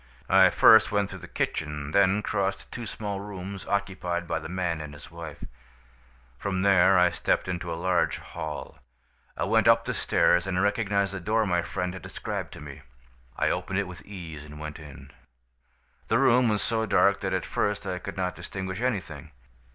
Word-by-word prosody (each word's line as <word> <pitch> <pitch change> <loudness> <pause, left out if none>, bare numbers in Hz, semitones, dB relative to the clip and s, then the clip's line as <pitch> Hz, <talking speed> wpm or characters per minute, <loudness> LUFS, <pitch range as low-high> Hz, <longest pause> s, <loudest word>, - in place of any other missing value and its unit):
"I 95 0 +7
first 110 +5 +7
went 100 -1 0
through 95 - -7
the 90 - -10
kitchen, 75 -3 -3
then 100 +3 +3
crossed 100 -2 -2
two 120 -2 -6
small 100 -2 -4
rooms 100 -1 -7
occupied 90 -4 -2
by - - -1
the 80 - -8
man 85 -3 -2
and 75 -1 -8
his 75 - -12
wife. 80 -3 -9 1.0
From 95 -2 -1
there 95 -1 +5
I 90 -1 +5
stepped - - 0
into 85 -2 -3
a 80 - -3
large 90 +2 +1
hall. 80 -3 -7 0.6
I - - -1
went - - +3
up - - +5
the - - -2
stairs, 90 +2 +2
and 90 -2 -1
I - - +2
recognized 100 -1 +1
the 100 - -4
door 110 +4 +1
my 90 -3 +1
friend 90 +1 -3
had 95 - -8
described - - -5
to - - -10
me. 70 -2 -10 0.6
"I - - +2
opened 90 +1 -2
it 100 -1 0
with 90 -2 -10
ease 85 -7 -8
and 75 0 -11
went 75 +1 -7
in. 75 -3 -12 1.0
"The 115 - +3
room 125 -2 +4
was 105 -2 +1
so 110 -1 0
dark 100 -1 +4
that 95 - -2
at 95 - -2
first 105 -1 -1
I 90 -1 -3
could 100 +2 -7
not 90 -1 -1
distinguish 95 +1 -5
anything. 110 - -3
95 Hz, 190 wpm, -27 LUFS, 85-100 Hz, 1.0 s, I